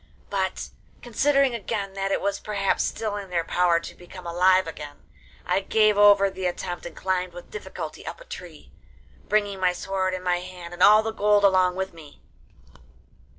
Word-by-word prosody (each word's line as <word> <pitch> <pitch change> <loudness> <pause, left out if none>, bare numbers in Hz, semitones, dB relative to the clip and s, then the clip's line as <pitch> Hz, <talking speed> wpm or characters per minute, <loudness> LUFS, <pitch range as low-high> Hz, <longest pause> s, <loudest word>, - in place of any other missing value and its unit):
But - - -2 0.3
considering 275 +2 +2
again 205 -3 -4
that 195 0 -2
it - - 0
was 200 0 -1
perhaps 200 -2 -1
still 215 -2 -3
in 200 -2 -7
their 170 -2 0
power 175 0 +2
to - - -9
become 180 +1 -13
alive 185 +2 +3
again, 150 -3 -9 0.4
I 180 +2 +1
gave 215 +2 +3
over 205 -1 +6
the 190 -1 -3
attempt 175 0 -4
and - - -11
climbed 185 -1 -1
with 175 - -11
difficulty 430 - -7
up - - -6
a - - -13
tree, - - -10 0.6
bringing 205 -2 +1
my 180 -1 +2
sword 190 0 -2
in 185 - -7
my 180 -1 +1
hand 180 -1 -9
and 175 - -9
all 215 +2 +7
the 225 - -2
gold 205 -1 +3
along 185 -2 +4
with 190 0 -3
me. 155 -3 -14
190 Hz, 180 wpm, -25 LUFS, 180-205 Hz, 0.6 s, all